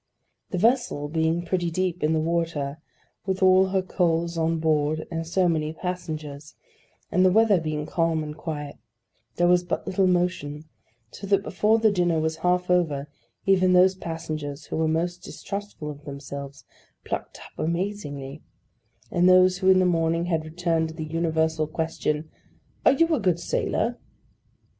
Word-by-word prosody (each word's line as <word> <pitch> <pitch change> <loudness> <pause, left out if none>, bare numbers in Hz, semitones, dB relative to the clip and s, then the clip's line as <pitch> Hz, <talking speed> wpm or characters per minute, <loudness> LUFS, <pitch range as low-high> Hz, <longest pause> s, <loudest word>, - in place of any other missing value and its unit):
The 185 - -3
vessel 225 - +1
being 160 +2 0
pretty 175 0 0
deep 180 +1 -2
in 155 +1 +2
the 160 - +2
water, 160 -3 -1 0.5
with 190 0 0
all 185 0 +6
her 190 0 0
coals 170 -2 0
on 165 0 +1
board 155 -1 +1
and 165 -1 -3
so 180 +2 +2
many 155 -2 0
passengers, 155 -5 -6 0.6
and 185 - +3
the 185 - +5
weather 210 -3 +4
being 155 -1 -3
calm 165 -1 0
and 150 0 -6
quiet, 150 -2 -6 0.6
there 175 - +3
was 180 0 +4
but 175 - -3
little 190 0 +1
motion; 175 -4 -1 0.5
so 200 - -8
that 200 0 +2
before 210 +4 +2
the 220 -1 +3
dinner 175 -4 +1
was 160 0 -1
half 180 +2 +1
over, 150 -5 +1 0.4
even 185 -1 +4
those 185 +1 +6
passengers 155 -4 -5
who - - -4
were 160 0 +1
most 175 +3 -1
distrustful 200 -8 -6
of 145 0 -12
themselves 140 0 -8 0.4
plucked - - -5
up - - -14
amazingly; 155 -5 -3 0.7
and 175 +1 +4
those 185 0 +5
who 190 -1 +3
in 190 - +7
the 185 - +4
morning 165 -1 +1
had 165 -3 -1
returned 165 0 -1
to 160 - -9
the 160 -1 -5
universal 160 -1 0
question, 155 -1 -2 0.6
'Are - - +7
you 330 +4 +2
a 300 - +2
good 180 -5 +1
sailor? 235 +7 -1
165 Hz, 160 wpm, -25 LUFS, 155-185 Hz, 0.7 s, in